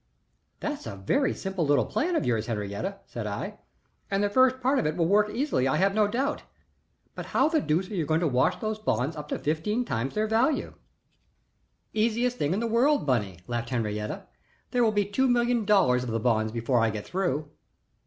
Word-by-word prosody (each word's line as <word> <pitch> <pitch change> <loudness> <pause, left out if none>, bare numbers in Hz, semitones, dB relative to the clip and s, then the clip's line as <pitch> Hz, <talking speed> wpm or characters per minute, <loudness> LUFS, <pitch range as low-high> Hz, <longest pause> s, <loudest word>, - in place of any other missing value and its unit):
"That's - - -4
a - - -5
very 110 - +1
simple 190 -3 -3
little 145 -1 +3
plan 350 +3 -1
of - - 0
yours, 115 -3 0
Henriette," 105 - -4
said 115 -3 -6
I, 100 0 -5 0.5
"and 195 +1 +1
the 205 - +1
first 260 +2 +4
part 265 +2 +2
of 230 - 0
it 155 +3 -2
will 170 - +2
work 205 +4 +3
easily 230 - 0
I 130 - +1
have 195 +1 +2
no 210 0 +3
doubt; 270 +7 -1 0.7
but - - -7
how 270 - +3
the 315 -2 +2
deuce 170 - 0
are - - -4
you 165 -5 -1
going 160 +2 +2
to 170 - +2
wash 130 -2 +2
those 215 0 -3
bonds 140 - -1
up 150 -1 -7
to - - -2
fifteen 185 +11 -1
times 125 - -2
their 215 +1 +1
value?" 230 +7 +1 1.2
"Easiest 235 +3 +1
thing 145 - 0
in 190 - 0
the - - 0
world, 240 - +2
Bunny," 105 - -1
laughed 120 -1 -3
Henriette. 105 -3 -3 0.4
"There 245 -1 +2
will 225 - +4
be 205 -1 +1
two 235 +7 +1
million 240 -2 +2
dollars 130 -12 +4
of 125 - -4
the 115 0 -1
bonds 110 -1 +1
before 120 +2 0
I 115 0 +3
get 105 -1 -5
through." 155 -6 -2
185 Hz, 205 wpm, -27 LUFS, -, 1.2 s, first